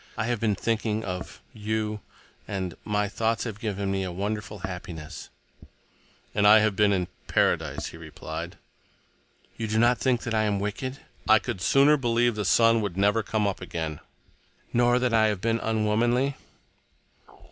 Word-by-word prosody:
I 110 - 0
have 120 -1 -1
been 105 -2 +1
thinking 110 +1 -1
of 90 -2 -6
you. 110 0 -2 0.5
And—my 100 +2 -2
thoughts 110 +2 -1
have 110 -4 -5
given 100 -3 -2
me 95 0 0
a 90 - -4
wonderful 105 +3 -4
happiness." 85 -4 -7 1.0
"And 105 0 +3
I 105 +1 +9
have 110 -2 +2
been—in 100 -3 +2 0.2
paradise," - - +1
he - - -11
replied. 80 -2 -7 1.0
"You 115 - -3
do 110 +1 -1
not 120 +1 +4
think 125 -1 +1
that 115 - -3
I 110 -1 +2
am 100 -1 0
wicked?" 120 +7 -3 0.3
"I 110 - +8
could 95 - -4
sooner 140 - +5
believe 120 -2 +2
the 105 -1 -3
sun 115 +3 +4
would 100 -4 -3
never 100 +3 +3
come 110 0 -1
up 100 -2 -2
again." 80 -4 -4 0.7
"Nor 120 0 +4
that 125 -1 0
I 110 -1 +5
have 105 -3 -1
been 115 +3 0
unwomanly?" 115 +5 +1
110 Hz, 160 wpm, -26 LUFS, 100-115 Hz, 1.0 s, I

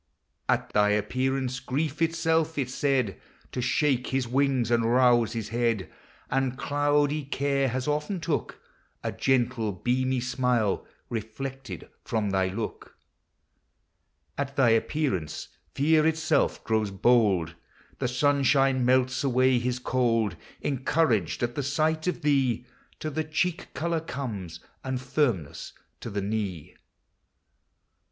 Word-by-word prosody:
• - - +7
••.., - - -3
At - - -19
thy 105 0 +4
appearance, 130 +4 0
Grief 145 +4 -2
itself 165 -1 +1
is 130 -3 -1
said 130 -8 0 0.3
To 125 - -3
shake 130 0 +1
his 130 -2 -1
wings, 130 -2 +1
and 115 -1 +3
rouse 120 -2 +4
his 115 -3 -4
head: 115 -4 0 0.4
And 135 -1 0
cloudy 145 +1 +1
Care 140 0 0
has 130 +2 -2
often 150 +6 -1
took 160 -3 -2 0.4
A - - -1
gentle 120 -4 +1
beamy 130 +6 0
smile, 125 -4 0 0.2
reflected 125 +4 -6 0.2
from 110 -3 -1
thy 95 -1 +2
look. 105 +3 -6 1.4
At 140 0 -2
thy 130 -4 +4
appearance, 115 - 0 0.3
Fear 155 +2 +4
itself 160 0 +1
grows 110 -2 +1
bold; 100 -5 +3 0.5
The - - 0
sunshine 135 0 +3
melts 130 +1 +2
away 130 -1 +3
his 125 +1 -1
cold. 115 -6 +1 0.3
Encouraged 130 - +1
at 120 0 0
the 145 - -2
sight 155 +4 0
of 180 - -2
thee 130 -5 +2 0.4
To 155 - -3
the 155 +2 -1
cheek 160 +4 -1
color 165 +4 0
comes, 105 - -6 0.2
and 130 -1 -2
firmness 125 - -1 0.3
to - - -6
the 100 -1 -3
knee. 100 -6 -3
130 Hz, 130 wpm, -27 LUFS, 115-145 Hz, 1.4 s, •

